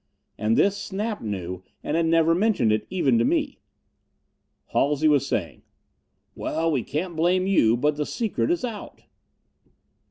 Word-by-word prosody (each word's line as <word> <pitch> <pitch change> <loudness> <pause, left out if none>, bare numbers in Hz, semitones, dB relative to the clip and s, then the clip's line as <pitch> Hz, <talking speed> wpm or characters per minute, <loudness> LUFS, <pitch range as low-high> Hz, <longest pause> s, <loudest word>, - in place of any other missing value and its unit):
And 110 +1 0
this 200 0 +3
Snap 210 +2 -4
knew, 95 -4 -5 0.2
and 150 - -2
had 165 0 +2
never 165 0 +4
mentioned 180 - +2
it, 110 0 -1
even 135 -11 +2
to - - +3
me. - - 0 1.1
Halsey 145 +2 +2
was 145 -2 +3
saying, 85 - -3 0.7
"Well, 165 +1 -1
we 135 -5 +1
can't 170 +8 -4
blame 180 +3 +2
you, 120 - +3
but 145 +3 0
the 150 - -1
secret 230 +4 -1
is 345 -6 0
out." 220 -4 -8
160 Hz, 150 wpm, -24 LUFS, 120-190 Hz, 1.1 s, never